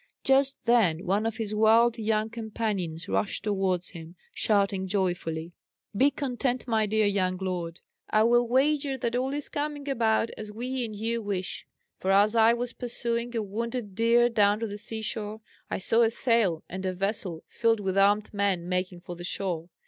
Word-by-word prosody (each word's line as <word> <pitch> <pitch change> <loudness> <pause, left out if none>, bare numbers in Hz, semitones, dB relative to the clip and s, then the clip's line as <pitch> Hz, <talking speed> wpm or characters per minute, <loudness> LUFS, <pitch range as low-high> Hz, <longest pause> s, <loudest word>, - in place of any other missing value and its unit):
Just 270 -2 +3
then 205 -8 +3
one 200 +4 +1
of 225 - -4
his 215 -2 -3
wild 225 +2 +4
young 215 0 0
companions 210 -7 -3
rushed 205 - -1
towards 190 -4 0
him, 165 0 -10 0.2
shouting 195 -2 +1
joyfully: 175 -4 -2 0.4
"Be 270 +7 +5
content 255 -2 -2
my 220 -2 +1
dear 215 +1 +2
young 185 -2 +1
lord! 180 -3 -4 0.3
I 215 0 +4
will 240 +1 +4
wager 275 +2 +2
that 235 -1 -2
all 260 +2 0
is 290 0 -3
coming 290 -1 -4
about 230 -4 +1
as 215 -1 -6
we 250 +4 -3
and 215 -2 -7
you 230 +2 -2
wish; 195 -3 -4 0.3
for 190 - -2
as 205 +3 +4
I 225 0 +6
was 240 +1 -2
pursuing 235 -1 -3
a 225 - 0
wounded 230 +1 -4
deer 230 +3 +4
down 210 -3 +3
to - - 0
the 205 -2 -5
sea 220 +1 -5
shore, 215 0 -4 0.3
I - - -1
saw 225 +5 +2
a 225 - +5
sail 225 -8 +1
and 185 +2 -6
a 185 -1 -1
vessel 190 -3 -3
filled 230 -1 +1
with 190 -2 -2
armed 205 +2 +3
men 195 -4 0
making 180 -1 -2
for 175 0 -8
the 175 - -9
shore. 175 -2 -3
215 Hz, 180 wpm, -27 LUFS, 190-235 Hz, 0.4 s, I